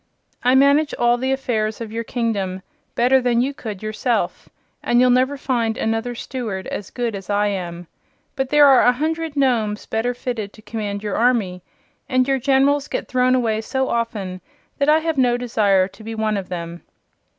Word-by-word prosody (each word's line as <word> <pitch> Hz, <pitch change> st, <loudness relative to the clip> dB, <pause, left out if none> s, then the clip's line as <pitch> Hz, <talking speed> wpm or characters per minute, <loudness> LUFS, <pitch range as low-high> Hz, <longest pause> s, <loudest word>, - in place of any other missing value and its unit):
"I 250 Hz, +2 st, +4 dB
manage 280 Hz, +3 st, +4 dB
all 240 Hz, 0 st, +2 dB
the 260 Hz, +1 st, -1 dB
affairs 220 Hz, -5 st, -1 dB
of 225 Hz, -2 st, -6 dB
your 230 Hz, +1 st, -3 dB
kingdom 200 Hz, -6 st, -2 dB, 0.3 s
better 255 Hz, +2 st, +4 dB
than 245 Hz, -1 st, +2 dB
you 265 Hz, +4 st, 0 dB
could 215 Hz, -7 st, -7 dB
yourself, 215 Hz, -2 st, -2 dB, 0.3 s
and 240 Hz, -, +2 dB
you'll 250 Hz, 0 st, +5 dB
never 260 Hz, +3 st, +2 dB
find 235 Hz, -5 st, -1 dB
another 225 Hz, +2 st, -1 dB
Steward 225 Hz, -7 st, -5 dB
as 200 Hz, -, -5 dB
good 240 Hz, -2 st, -3 dB
as 195 Hz, -2 st, -8 dB
I 205 Hz, 0 st, +2 dB
am. 175 Hz, -3 st, -5 dB, 0.5 s
But 265 Hz, -2 st, -2 dB
there 295 Hz, 0 st, +6 dB
are 270 Hz, -2 st, +7 dB
a 245 Hz, -, +5 dB
hundred 320 Hz, +3 st, -2 dB
Nomes 225 Hz, -6 st, +1 dB
better 240 Hz, +3 st, -1 dB
fitted 230 Hz, -5 st, -4 dB
to 215 Hz, -, -15 dB
command 210 Hz, -3 st, -4 dB
your 205 Hz, -2 st, -2 dB
army, 220 Hz, -7 st, +1 dB, 0.5 s
and 255 Hz, -1 st, +2 dB
your 270 Hz, -1 st, +1 dB
Generals 275 Hz, +2 st, +2 dB
get -, -, -4 dB
thrown 255 Hz, 0 st, +2 dB
away 225 Hz, -3 st, 0 dB
so 265 Hz, +4 st, -2 dB
often 210 Hz, -6 st, -3 dB, 0.4 s
that 280 Hz, +1 st, +2 dB
I 305 Hz, -, +6 dB
have 320 Hz, -3 st, -1 dB
no 245 Hz, -2 st, +3 dB
desire 205 Hz, -6 st, +2 dB
to 200 Hz, +3 st, -15 dB
be 225 Hz, +1 st, -6 dB
one 220 Hz, -1 st, 0 dB
of 195 Hz, -2 st, -4 dB
them." 170 Hz, -1 st, -6 dB
235 Hz, 185 wpm, -21 LUFS, 210-260 Hz, 0.5 s, are